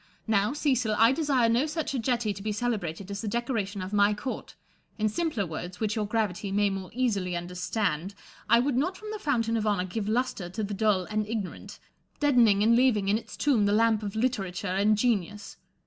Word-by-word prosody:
Now, 210 -1 +2
Cecil, 255 -7 +1
I 225 +2 +6
desire 270 -5 +2
no 240 +6 +2
such 310 -1 -3
a 265 - -1
jetty 235 -3 0
to 195 - -9
be 215 +1 -2
celebrated 200 -5 -3
as 200 - -4
the 225 - -4
decoration 210 -4 -2
of 185 +3 -7
my 205 0 +4
court: 255 +5 -6 0.4
in 215 -1 +1
simpler 260 - -1
woi'ds, 175 +2 -6
which 215 0 -1
your 215 -2 -1
gravity 210 -2 -1
may 205 0 +2
more 195 -1 -5
easily 200 -8 -1
understand, 180 0 -2 0.3
I 235 +1 +6
would 270 0 0
not 360 +8 0
from 430 +1 -8
the 430 - -5
fountain 230 - 0
of 215 -1 -1
honour 200 -3 +1
give 205 +3 -3
lustre 225 -6 -1
to 215 +5 -4
the 205 0 -3
dull 200 -2 +2
and 215 +1 -2
ignorant, 215 -4 -5 0.4
deadening 235 -8 +4
and 230 +2 +5
leaving 235 -6 +3
in 210 +2 +3
its - - -12
tomb 240 -9 +2
the 205 - +2
lamp 220 0 +3
of 205 -1 -5
literature 210 -6 -1
and 205 +3 +2
genius. 210 -3 -1
215 Hz, 205 wpm, -27 LUFS, 200-240 Hz, 0.4 s, I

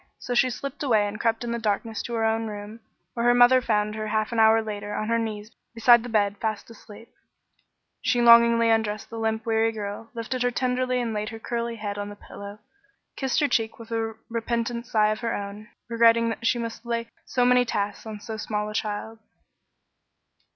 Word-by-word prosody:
So 245 - -4
she 255 +1 +3
slipped 275 +3 -6
away 225 -7 +3
and 205 +1 -6
crept 230 0 0
in 235 - -3
the 235 - -2
darkness 220 0 -2
to 240 - -5
her 225 -1 +1
own 225 0 0
room, 210 +1 -8 0.3
where 235 0 0
her 245 - +5
mother 245 +1 +6
found 210 -3 0
her 215 0 -4
half 215 +1 -1
an 230 - -1
hour 220 0 +6
later 205 -1 -5
on 215 - -2
her 230 0 +2
knees 215 -1 -5 0.2
beside 235 +1 +6
the 245 - -7
bed 205 -2 +1
fast 220 0 -3
asleep. 220 0 -14 0.9
She 245 - +1
lovingly 235 -1 +6
undressed 215 -2 -1
the 230 - -5
limp, 220 0 -1
weary 225 0 +2
little 225 - -3
girl, 205 +2 -6
lifted 235 +2 -3
her 245 - +3
tenderly 255 0 0
and 235 -2 -2
laid 210 0 -2
her 225 - -7
curly 235 +1 -3
head 205 -2 -5
on 205 0 -4
the 205 - -9
pillow, 200 0 -10
and 400 - -29
kissed 265 +2 0
her 290 - +3
cheek 225 -4 0
with 230 0 -12
a 225 -1 -2
repentant 235 0 -2
sigh 215 -3 +3
of 215 0 -1
her 230 -1 -2
own, 205 +2 -7 0.2
regretting 230 0 +4
that 230 0 -3
she 245 - +2
must 230 -1 -5
lay 230 -1 -2 0.2
so 250 -1 +1
many 250 0 +5
tasks 205 -2 -3
on 215 -1 -6
so 220 0 -6
small 210 0 -3
a - - -7
child. 215 +1 -4
225 Hz, 215 wpm, -25 LUFS, 215-235 Hz, 0.9 s, mother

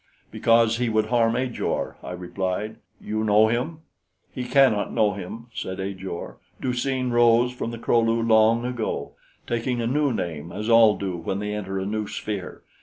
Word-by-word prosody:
"Because 115 0 +3
he 120 -1 0
would 110 -1 +2
harm 115 -1 +3
Ajor," 125 -1 -2
I - - -8
replied. 95 +4 -3 0.2
"You 110 +1 -3
know 110 +1 +5
him?" 135 +8 -2 0.5
"He 125 - -4
cannot 125 -6 +3
know 105 -3 +2
him," 100 +4 -7
said 95 -4 -5
Ajor. 95 -2 -6 0.2
"Du 125 - -1
seen 130 0 -1
rose 120 +1 +4
from 125 -2 -4
the 115 - -6
Kro 115 +1 +2
lu 115 0 +2
long 115 +1 +4
ago, 125 -3 -3 0.3
taking 120 +1 -1
a 115 - -1
new 140 +3 +1
name, 85 -7 -4
as 105 +5 -4
all 115 -3 +6
do 95 -3 -3
when 85 +3 -3
they 105 +1 -3
enter 95 -2 -4
a 95 - -2
new 105 +1 -2
sphere. 105 -4 -5
115 Hz, 180 wpm, -24 LUFS, 100-120 Hz, 0.5 s, all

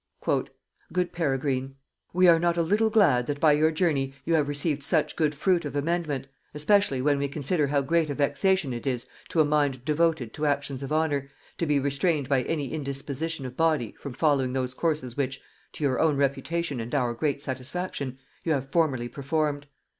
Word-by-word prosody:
"Good 180 -1 0
Peregrine, 135 -4 -1 0.4
"We 180 +1 +4
are 165 -1 +7
not 170 0 +1
a 170 - +3
little 210 +6 +2
glad 200 - +4
that 145 -1 -2
by 155 0 +5
your 150 +2 +4
journey 150 -5 0
you 165 - +1
have 150 -3 +3
received 145 0 -1
such 155 +2 +1
good 155 -2 +1
fruit 175 +3 +2
of 145 -1 -5
amendment, 150 -2 -1 0.3
especially 150 -4 +3
when 145 -1 +2
we 140 - 0
consider 145 +2 0
how 140 0 +2
great 160 +2 +1
a 145 - -2
vexation 145 +2 +1
it 120 +3 -5
is 125 -2 -1 0.2
to 160 - +3
a - - +4
mind 145 -4 +1
devoted 155 -6 +1
to 150 -1 -1
actions 140 -2 -1
of 135 - -5
honor, 145 -3 0 0.3
to 170 - 0
be 150 -1 +3
restrained 140 +1 +1
by 135 -2 +2
any 150 -4 -2
indisposition 140 +1 -3
of 125 0 -7
body 155 -8 +1
from 140 - -7
following 135 -3 +1
those 130 -1 -1
courses 150 -5 -1
which, 135 -1 -2 0.3
to - - -6
your 135 -3 +1
own 155 -3 +3
reputation 140 +1 -1
and 115 +5 -4
our 125 -4 +1
great 140 +4 -1
satisfaction, 135 0 -4 0.3
you 160 - +1
have 135 -1 -3
formerly 140 -8 +1
performed. 145 +2 -2
145 Hz, 190 wpm, -27 LUFS, 135-160 Hz, 0.4 s, are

